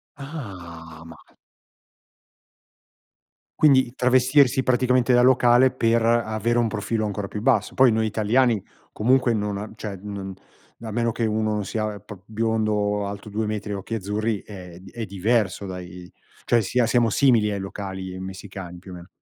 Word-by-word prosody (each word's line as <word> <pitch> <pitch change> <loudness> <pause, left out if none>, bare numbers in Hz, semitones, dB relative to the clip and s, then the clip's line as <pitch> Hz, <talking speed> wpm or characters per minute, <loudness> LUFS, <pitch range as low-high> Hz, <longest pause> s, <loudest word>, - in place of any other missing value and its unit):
Ah 90 - -9
ma 80 -1 -12 2.4
quindi 130 -5 +5
travestirsi 130 +1 +3
praticamente 125 -1 +2
da 120 - +5
locale 125 0 +5
per 115 -2 +1
avere 115 0 +1
un 115 - +2
profilo 110 +1 -2
ancora 100 -1 -4
più 105 - -6
basso. 115 -4 +1
Poi 130 -2 +5
noi 110 0 +1
italiani, 110 0 +1 0.3
comunque, 125 +2 +2
non 105 -2 -2
a 105 +1 -6
cioè, 105 -2 -6
non 100 -1 -6 0.5
a 110 -2 -6
meno 115 +1 0
che 115 0 -2
uno 110 0 0
non 105 -2 -2
sia 110 0 -3
pr 105 -1 -12
biondo, 105 -2 -1
alto 100 +1 -7
2 105 +1 -2
metri 105 -1 -4
e - - -2
occhi 100 +3 -5
azzurri, 105 +1 -2
è 90 -4 -11
d 95 - -14
è 115 -2 -5
diverso, 100 0 0
dai. 90 -1 -8 0.4
Cioè, 120 -1 +3
sia 115 +5 +1
siamo 120 -1 +2
simili 115 -3 +3
ai 100 - -2
locali 95 -1 -6
messicani, 95 -1 -8
più 95 +1 -12
o - - -8
meno. 90 +1 -11
110 Hz, 160 wpm, -23 LUFS, 100-120 Hz, 2.4 s, quindi